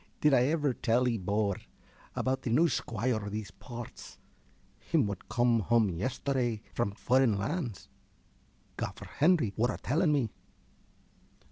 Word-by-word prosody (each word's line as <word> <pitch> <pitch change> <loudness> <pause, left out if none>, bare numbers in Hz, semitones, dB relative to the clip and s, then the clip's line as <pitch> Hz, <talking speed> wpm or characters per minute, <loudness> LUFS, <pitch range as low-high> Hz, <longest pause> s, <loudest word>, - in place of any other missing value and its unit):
~ - - -37
Did 150 -1 +5
I 125 -1 +5
ever 150 -3 +1
tell 120 +1 +1
'ee, 115 -3 0
bor, 100 +1 0 0.6
about 130 0 0
t' 125 - -3
new 155 +9 +4
squoire 115 -3 -1
o' 100 - -4
these 105 0 -5
parts 120 +3 -9 0.6
him - - +1
wot 100 -2 -5
cum 120 -1 +3
hum 110 0 +3
yesterday 120 - -1
from 110 -4 -1
furren 125 -2 +3
lands? 120 - -3 0.9
Gaffer - - -5
Henry 150 - +2
wor 120 +3 +2
a - - -5
telling 155 +5 +1
me. 130 -7 +1
120 Hz, 145 wpm, -30 LUFS, 105-130 Hz, 0.9 s, Did